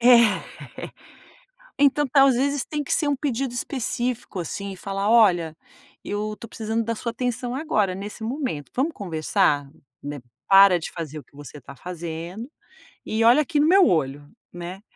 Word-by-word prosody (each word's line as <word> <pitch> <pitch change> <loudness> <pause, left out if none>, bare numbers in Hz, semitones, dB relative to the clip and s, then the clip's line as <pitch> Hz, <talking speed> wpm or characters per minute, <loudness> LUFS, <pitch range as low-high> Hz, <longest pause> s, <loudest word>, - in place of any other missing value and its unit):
É. 235 -3 +6 1.4
Então 290 +1 +3
tá, 275 +1 +5
às 270 -2 +4
vezes 280 +1 0
tem 300 -1 -3
que - - -4
ser 300 - +2
um 285 - +1
pedido 265 -3 -2
específico, 245 -5 -3
assim, 200 +4 -5
e 190 - -9
falar: 195 +2 -2
"Olha, 175 -9 +4 0.5
eu 210 +1 -3
estou 230 - -11
precisando 225 0 -2
da 230 - -2
sua 235 +1 -4
atenção 245 +1 -3
agora 215 - 0
nesse 205 +4 -7
momento, 235 - -4
vamos 285 +6 0
conversar? 155 - 0 0.3
Né, 145 -1 -6 0.3
para 195 -2 +7
de 160 - -6
fazer 155 -3 -6
o - - -11
que - - -32
você 145 0 -10
está 140 +1 -12
fazendo 175 - -7 0.6
e 220 +1 0
olha 245 +6 +6
aqui 300 0 -1
no 300 - +4
meu 375 0 +6
olho, 145 -2 -1 0.2
né." 175 +2 -7
220 Hz, 170 wpm, -24 LUFS, 175-255 Hz, 1.4 s, para